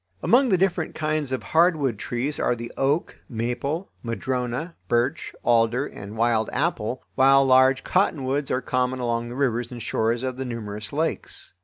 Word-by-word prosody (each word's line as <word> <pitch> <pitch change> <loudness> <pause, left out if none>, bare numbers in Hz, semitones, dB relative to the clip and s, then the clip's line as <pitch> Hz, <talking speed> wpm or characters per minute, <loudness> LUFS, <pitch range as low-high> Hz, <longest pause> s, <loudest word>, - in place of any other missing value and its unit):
Among 255 +2 +4
the 190 - +4
different 175 -3 0
kinds 155 -3 -1
of 130 -4 -2
hardwood 155 - +2
trees 125 +7 -3
are 125 - +1
the 120 0 -7
oak, 140 +5 0
maple, 130 - -3
madrona, 125 +6 -3
birch, 120 +7 0
alder, 120 +3 +3
and 105 -5 -9
wild 115 -1 +2
apple, 130 -5 -1
while 135 +1 +5
large 130 0 +5
cottonwoods 145 -7 0
are 130 - 0
common 130 0 0
along 120 -1 -1
the 120 - -7
rivers 120 -3 0
and 120 - -7
shores 115 +1 0
of 130 -1 -3
the 135 - -3
numerous 105 -4 -6
lakes. 160 - -3
130 Hz, 160 wpm, -24 LUFS, 120-145 Hz, -, while